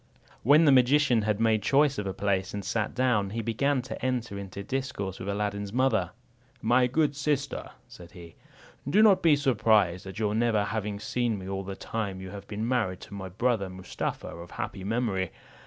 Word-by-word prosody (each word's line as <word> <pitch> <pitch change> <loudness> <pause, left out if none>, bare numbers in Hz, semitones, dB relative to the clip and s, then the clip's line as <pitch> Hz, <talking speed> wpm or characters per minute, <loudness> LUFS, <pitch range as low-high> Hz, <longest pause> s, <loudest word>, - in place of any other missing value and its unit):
When 150 +6 +6
the 145 - +6
magician 130 -1 +4
had 105 0 0
made 110 -2 +3
choice 140 +4 +3
of 100 - -3
a - - -1
place, 95 -1 -1
and 100 -2 -5
sat 110 +2 -2
down, 120 -6 +2
he 115 +3 -4
began 130 +4 0
to 130 - -7
enter 125 -5 -1
into 100 0 -7
discourse 130 -6 -4
with 95 - -5
Aladdin's 100 0 -2
mother. 115 -7 +2 0.5
"My 120 +3 +3
good 145 +2 +1
sister," 145 -1 -2 0.2
said 90 -7 -13
he, 85 -2 -12 0.6
"do 210 +9 +5
not 205 -4 +6
be 160 -3 +5
surprised 110 - +2
at 95 - -8
your 105 -1 0
never 110 -2 +2
having 105 -1 -3
seen 115 +1 -1
me 95 -1 -8
all 95 0 -3
the 95 0 -6
time 100 -2 -4
you 95 0 -8
have 100 0 -9
been 110 +2 -3
married 110 -8 0
to - - -11
my 95 -2 -6
brother 110 0 0
Mustapha 95 0 -5
of 85 +1 -10
happy 95 -1 -5
memory. 100 -4 -1
110 Hz, 190 wpm, -28 LUFS, 100-125 Hz, 0.6 s, When